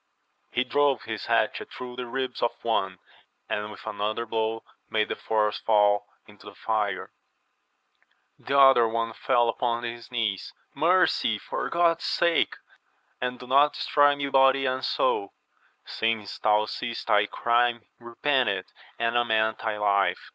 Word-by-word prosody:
He 125 - 0
drove 140 -1 +1
his - - -6
hatchet - - 0
through 125 -1 -8
the 125 -1 -5
ribs 130 0 -4
of 120 - +1
one, 95 -5 -1 0.5
and 105 0 -3
with 105 - -12
another 110 +2 -3
blow 110 0 -2 0.3
made 105 -1 0
the - - -2
fourth 105 -1 0
fall 105 -1 +2 0.2
into 105 -1 -17
the 105 - -11
fire; 105 -3 -2 1.3
the 140 - -1
other 135 -4 +7
one 115 0 -2
fell 120 +1 +1
upon 120 0 -1
his 120 +1 -7
knees, 110 -5 -2 0.2
Mercy, 170 - +2
for - - -4
God's 170 -1 +1
sake, 170 -1 +1 0.7
and 125 0 -2
do - - -10
not 140 +3 +4
destroy 145 0 +3
me 140 0 -3
body 135 0 +4
and 130 0 -1
soul! 440 -6 0 0.5
Since 110 -3 -2
thou 105 0 +3
seest 115 +2 -5
thy 105 0 +3
crime, 120 0 +1
repent 125 +2 0
it, 100 -2 -4 0.2
and 115 0 -1
amend 110 -2 +1
thy 110 -1 -3
life 100 -1 +1
115 Hz, 145 wpm, -26 LUFS, 105-130 Hz, 1.3 s, other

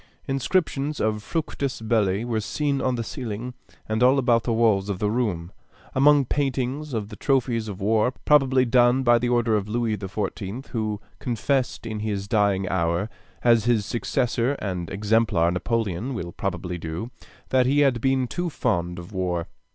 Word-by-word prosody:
Inscriptions 145 +1 0
of 110 -1 0
Fructus 140 -1 -3
Belli 110 -2 +1
were 115 -2 -1
seen 140 +5 -1
on 130 -1 +1
the 115 - -2
ceiling 120 -1 -5 0.3
and 110 +1 -1
all 130 +2 +5
about 120 -4 +2
the 120 - 0
walls 110 -4 +2
of 100 - -1
the 105 +1 0
room, 100 -8 -1 0.4
among 145 +1 +5
paintings 135 +2 -1
of 105 -2 -3
the 105 - -8
trophies 120 -3 0
of 100 -3 -6
war; 110 +4 +2
probably 135 -3 +4
done 125 +2 +4
by 120 -1 +5
the 120 - 0
order 120 -2 +2
of 105 -1 -1
Louis 115 -1 0
XIV., 105 +4 -4
who 110 -3 -2 0.2
confessed 125 +1 -1
in 110 -2 -4
his 100 -2 -3
dying 100 -2 +2
hour, 85 +3 0 0.3
as 115 -2 +4
his 115 -4 +2
successor 120 +2 0
and 90 -9 -4
exemplar 105 -4 +2
Napoleon 115 +4 -2
will 85 -6 -5
probably 90 -1 -4
do, 85 +9 -5 0.4
that 130 -1 +3
he 145 +2 +3
had 130 -5 +3
been 135 0 +2
too 175 +8 -3
fond 90 - -1
of 85 +2 -9
war. 90 -3 -2
115 Hz, 165 wpm, -24 LUFS, 100-130 Hz, 0.4 s, all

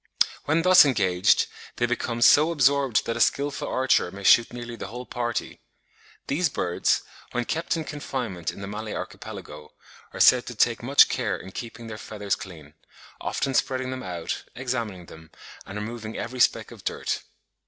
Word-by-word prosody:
When 160 +3 +2
thus 185 0 +8
engaged, 95 -10 +3 0.3
they 120 - +1
become 120 -1 -1
so 150 +6 +7
absorbed 140 -6 +2
that 115 - -2
a - - -4
skilful 140 0 +1
archer 130 -8 +2
may 100 +2 -10
shoot 115 +4 +6
nearly 120 -1 -7
the 105 - -7
whole 125 +4 -7
party. 120 -1 -3 0.6
These 155 +4 +1
birds, 90 -9 0 0.3
when 120 0 -1
kept 165 +4 -1
in 160 - -3
confinement 125 - -4
in - - -11
the 100 - -5
Malay 105 +1 -5
Archipelago, 75 0 -8 0.4
are - - -9
said 125 -1 +6
to 120 - -6
take 115 +1 +2
much 135 +4 +6
care 115 -6 -1
in 95 - -11
keeping 115 +2 -8
their 110 -1 -7
feathers 105 -2 -3
clean; 80 -7 -11 0.5
often 135 - -2
spreading 130 0 0
them 130 0 -5
out, 85 -3 -4
examining 115 -8 -3
them, 80 -1 -14 0.4
and 95 - -6
removing 110 0 -6
every 125 +2 -5
speck - - +2
of - - -13
dirt. - - -2
120 Hz, 170 wpm, -25 LUFS, 100-130 Hz, 0.6 s, thus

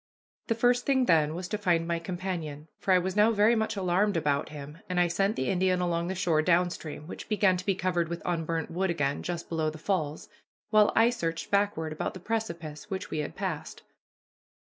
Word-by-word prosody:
The 230 - +1
first 245 +2 +2
thing 265 -2 +3
then 155 -5 +3
was 180 +1 -4
to 210 - -2
find 170 -4 +1
my 170 0 0
companion, 165 -4 -5
for 195 - 0
I 185 - +7
was 185 +1 -1
now 210 +1 +5
very 215 +1 +4
much 220 0 0
alarmed 195 +1 +1
about 145 -2 0
him, 150 +1 -9
and 180 -1 0
I 175 - +4
sent 195 +5 +1
the 130 - -1
Indian 185 -1 +2
along 170 -1 0
the 190 - -2
shore 175 -4 +2
down 175 +2 +3
stream, 155 -3 -7
which 170 - -8
began 205 -3 +3
to 185 - -6
be 195 - +3
covered 175 -2 0
with 170 0 -5
unburnt 165 -1 -2
wood 190 +3 0
again 145 -4 0
just 175 -1 -4
below 160 -2 0
the 155 - -8
falls, 160 -3 -2 0.4
while 215 -1 +5
I 230 +2 +5
searched 165 -9 -3
backward 200 -6 +1
about 155 - -3
the - - -7
precipice 170 -5 -4
which 190 -2 -4
we 155 - -2
had 150 - -4
passed. - - -4
175 Hz, 215 wpm, -28 LUFS, 160-200 Hz, 0.4 s, I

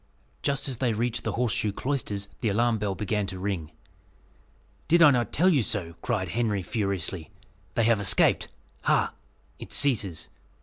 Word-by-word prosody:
Just 140 0 0
as 130 -4 -3
they 125 -4 +1
reached 120 +2 -1
the - - -2
Horseshoe 115 -3 0
Cloisters, 105 -5 -2
the 115 - 0
alarm 115 +2 +1
bell 100 -2 -2
began 105 0 -1
to 95 0 -5
ring. 90 -5 -3 1.2
"Did 170 +1 +5
I 150 - +8
not 120 -3 0
tell 180 +5 +4
you 150 -8 +3
so?" 90 -6 0
cried 105 -8 -1
Henry 105 -2 0
furiously; 95 -5 -3 0.5
"they 115 - +2
have 115 -1 +3
escaped. 100 - +4 0.4
Ha! - - +2 0.5
it - - -10
ceases! 105 - 0
110 Hz, 160 wpm, -27 LUFS, 100-120 Hz, 1.2 s, I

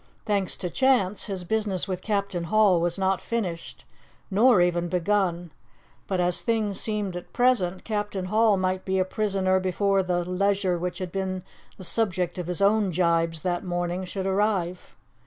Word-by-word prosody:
Thanks 200 -4 0
to 180 - -4
chance, 210 -7 +2
his 190 -3 -4
business 205 -1 -1
with 185 -2 -3
Captain 200 -4 -2
Hall 195 -1 +4
was 175 +1 -1
not 190 -1 +1
finished, 185 -8 -4 0.5
nor 220 +2 +5
even 175 0 +2
begun; 175 -1 0 0.6
but 190 -2 -1
as 180 0 +1
things 220 -4 0
seemed 210 -4 -2
at 175 - -8
present, 215 -8 +2
Captain 205 -3 -3
Hall 215 +1 +3
might 185 0 -1
be 190 0 -1
a 185 - +2
prisoner 190 -2 +1
before 195 +1 +1
the 175 -1 -1
leisure 190 -1 +1
which 180 0 -3
had 185 -2 -5
been 185 -1 -3 0.3
the 190 - -10
subject 185 -3 -1
of 175 - -4
his 180 +2 -1
own 205 0 +3
gibes 165 -2 +1
that 175 -1 -1
morning 175 0 -2
should 190 +1 -4
arrive. 190 -3 -1
190 Hz, 165 wpm, -26 LUFS, 180-205 Hz, 0.6 s, nor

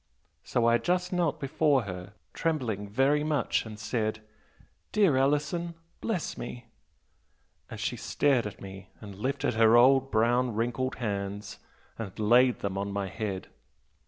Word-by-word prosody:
So 120 - 0
I 115 0 +4
just 180 +7 0
knelt 165 -4 0
before 140 -1 +2
her, 95 0 -7 0.2
trembling 120 -11 -2
very 135 +7 +2
much, 150 -6 0
and 110 -1 -8
said, 110 0 -2 0.7
'Dear 200 -9 +4
Alison, 150 +5 0 0.2
bless 215 -8 -3
me!' 120 0 -7 1.0
and - - -8
she - - -2
stared 135 -6 +1
at 100 - -9
me 95 -1 -10
and 100 -2 -9
lifted 130 +7 -1
her 115 +1 +5
old 135 +2 +5
brown 120 +1 +2
wrinkled 120 +3 -1
hands 100 -2 -4 0.4
and 100 -5 -6
laid 120 +4 +4
them 100 -1 -2
on 100 0 -3
my 100 -1 -2
head. 100 -2 -4
120 Hz, 140 wpm, -28 LUFS, 105-140 Hz, 1.0 s, her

